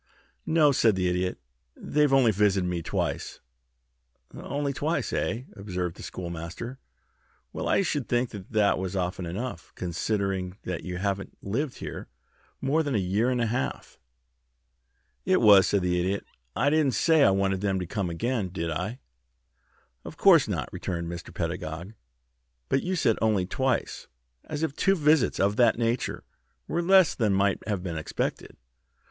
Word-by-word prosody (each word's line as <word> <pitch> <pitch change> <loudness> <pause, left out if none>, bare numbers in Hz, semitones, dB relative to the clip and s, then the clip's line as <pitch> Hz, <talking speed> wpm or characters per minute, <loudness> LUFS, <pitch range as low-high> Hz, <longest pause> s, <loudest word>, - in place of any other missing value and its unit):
"No," 155 -3 +5
said 115 -5 +3
the 90 -1 0
Idiot. 90 +1 -1 0.4
"They've 150 -1 +1
only 130 -4 +5
visited 100 -2 +2
me 90 -1 -2
twice." - - -3 0.9
"Only 140 0 -3
twice, 155 +5 -1
eh?" 115 +3 -1
observed 90 -4 -4
the - - -12
Schoolmaster. 85 +9 -6 0.7
"Well, - - -3
I - - +3
should 145 -7 -2
think 120 0 +1
that 105 0 0
was 95 0 -3
often 90 -1 -2
enough, 95 -1 -5
considering 95 +1 -2
that 90 -2 -4
you 90 -1 -4
haven't 100 +1 -3
lived 125 +7 -2
here - - -7 0.5
more 140 +4 +2
than 145 -5 -1
a - - +3
year 100 +5 +1
and 125 -1 0
a 120 - +2
half." 120 +4 -3 1.2
"It - - +3
was," 100 -2 +7
said 100 -3 +1
the 90 0 +1
Idiot. 95 +3 -1 0.3
"I 145 - +2
didn't 150 -5 +2
say 160 -3 +4
I - - +6
wanted 95 -1 +1
them 100 -2 0
to 90 - -3
come 95 +1 -2
again, 110 +3 -1
did 85 -2 -3
I?" 90 +9 -3 1.1
"Of - - -9
course - - +6
not," - - -2
returned 85 -2 -4
Mr. 85 -1 -7
Pedagog. 85 +2 -4 0.8
"But 135 - +2
you 185 +1 -2
said 115 -10 +2
'only 105 -4 +2
twice,' 130 +5 -1 0.4
as 150 +1 -4
if 155 -3 -1
two 195 0 +3
visits 150 -4 +3
of 100 +2 +2
that 120 -2 +4
nature 115 +1 -1 0.4
were 170 - 0
less 185 -1 +5
than 110 -5 +1
might 100 0 +2
have 100 -4 -2
been 85 -4 -3
expected." 75 - -4
100 Hz, 160 wpm, -27 LUFS, 90-130 Hz, 1.2 s, was